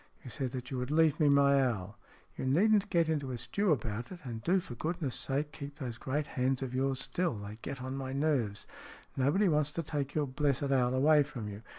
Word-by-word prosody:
You 125 - -8
said 130 +2 -3
that 125 0 -6
you 130 - -2
would 125 +1 -3
leave 155 -1 +3
me 150 -2 +5
my 140 -1 +5
owl." 105 -5 -2 0.2
" - - -32
You 130 - -3
needn't 200 +9 +3
get 170 -3 +3
into 150 -4 -1
a 125 - -3
stew 190 - 0
about 115 -4 -2
it, 180 - -8
and 115 -4 -6
do 185 - +3
for 150 - -8
goodness' 155 +1 -2
sake 145 +4 -2
keep 140 -2 -8
those 120 -5 -5
great 145 +3 -1
hands 130 -1 0
of 130 -1 -5
yours 135 +1 0
still. 170 +1 -1
They 105 +1 -8
get 130 -2 -6
on 130 +1 -4
my 130 -1 -4
nerves. 135 -8 0 0.5
Nobody 145 +10 +3
wants 150 -3 +2
to 165 - -2
take 145 -2 -3
your 150 -1 +2
blessed 140 0 0
owl 125 -1 +2
away 150 +3 +5
from 130 -7 -4
you. 100 +1 -8
135 Hz, 230 wpm, -32 LUFS, 125-150 Hz, 0.5 s, me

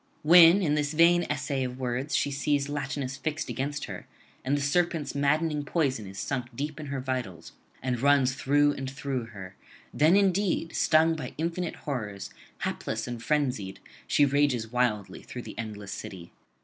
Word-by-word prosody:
When 170 +4 +8
in 150 -4 +2
this 150 0 0
vain 170 +2 +4
essay 135 -1 -1
of 125 0 -4
words 130 +3 -2
she 145 - +1
sees 140 0 0
Latinus 140 -2 -3
fixed 150 +3 -3
against 145 +2 -3
her, - - -8 0.4
and 140 +3 +1
the - - -2
serpent's 155 0 0
maddening 150 +2 +1
poison 135 - -1
is 95 0 -10
sunk 125 0 -3
deep 150 +3 -4
in 150 - -6
her 140 -1 -3
vitals 130 -9 -4 0.3
and 125 -2 -1
runs 140 -2 +4
through 145 +2 +3
and 135 -1 -5
through 135 -3 -3
her, 100 -4 -10 0.4
then 155 +5 +4
indeed, 195 -4 +1
stung 160 +1 +4
by 160 - -6
infinite 170 +2 -2
horrors, 105 -8 -4 0.3
hapless - - -3
and 120 -1 -5
frenzied, 125 -8 -1 0.3
she 145 - +4
rages 135 -5 +1
wildly 120 -5 -1
through - - -8
the - - -9
endless 105 -3 -6
city. 85 -3 -8
140 Hz, 165 wpm, -28 LUFS, 125-150 Hz, 0.4 s, When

